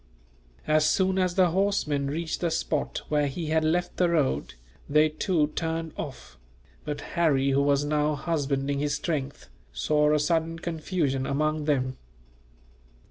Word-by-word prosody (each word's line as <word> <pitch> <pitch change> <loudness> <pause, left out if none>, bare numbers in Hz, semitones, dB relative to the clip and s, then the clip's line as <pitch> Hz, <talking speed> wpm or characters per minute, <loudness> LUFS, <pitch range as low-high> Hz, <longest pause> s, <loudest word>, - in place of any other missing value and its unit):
As 155 0 +3
soon 190 0 +2
as 180 -1 +1
the 185 -3 +4
horsemen 170 -7 0
reached 160 +3 -3
the 170 - +1
spot 160 -2 -2
where 150 -1 +2
he 155 +3 -4
had 160 0 +2
left 175 +3 0
the 180 -1 +3
road, 155 - 0 0.3
they 150 +2 +4
too 155 -1 0
turned 165 0 -3
off; 120 - -8 0.4
but 145 -1 -4
Harry, 140 -5 +2
who 135 +1 +3
was 140 0 +2
now 150 0 +1
husbanding 140 -3 -1
his 145 0 0
strength, 145 -4 -3 0.2
saw 150 - +2
a 150 - +4
sudden 165 +2 0
confusion 160 -5 -2
among 155 +2 0
them. 130 -3 0
150 Hz, 145 wpm, -27 LUFS, 145-165 Hz, 0.4 s, the